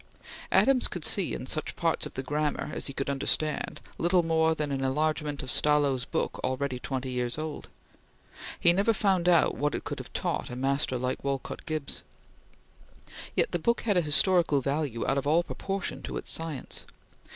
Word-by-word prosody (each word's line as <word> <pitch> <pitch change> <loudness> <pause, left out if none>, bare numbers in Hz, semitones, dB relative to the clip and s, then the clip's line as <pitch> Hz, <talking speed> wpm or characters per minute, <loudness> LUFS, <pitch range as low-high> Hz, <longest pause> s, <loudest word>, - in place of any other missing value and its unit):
Adams 265 -2 +4
could 175 -4 -5
see 195 -4 +1
in - - -6
such 155 +3 -3
parts 165 -2 0
of - - -15
the 130 - -3
"Grammar" 150 +1 -1
as - - -2
he - - -4
could 135 0 -3
understand, 140 +2 0 0.2
little 175 +1 +3
more 160 0 +2
than 150 -2 -2
an 135 -1 -1
enlargement 150 +1 0
of 130 - 0
Stallo's 145 -4 +3
book - - -2
already 130 0 -1
twenty 130 0 -3
years 125 0 -1
old. 155 -1 -5 0.9
He 170 - +6
never 200 +5 +3
found 190 -4 +2
out 170 -2 +5
what 145 +1 -1
it - - -4
could - - -5
have - - -9
taught - - -2
a 125 - -6
master 135 +1 0
like 125 +1 -2
Willard 140 +3 -3
Gibbs. 155 -3 -2 1.3
Yet - - +2
the 175 - 0
book 235 +8 +1
had 210 -4 +1
a 180 - +4
historical 165 0 +4
value 140 -3 -1
out 135 - +2
of 140 - -4
all 165 +4 +4
proportion 195 +2 -4
to - - -5
its - - -3
science. 160 -5 -2
150 Hz, 185 wpm, -28 LUFS, 135-165 Hz, 1.3 s, He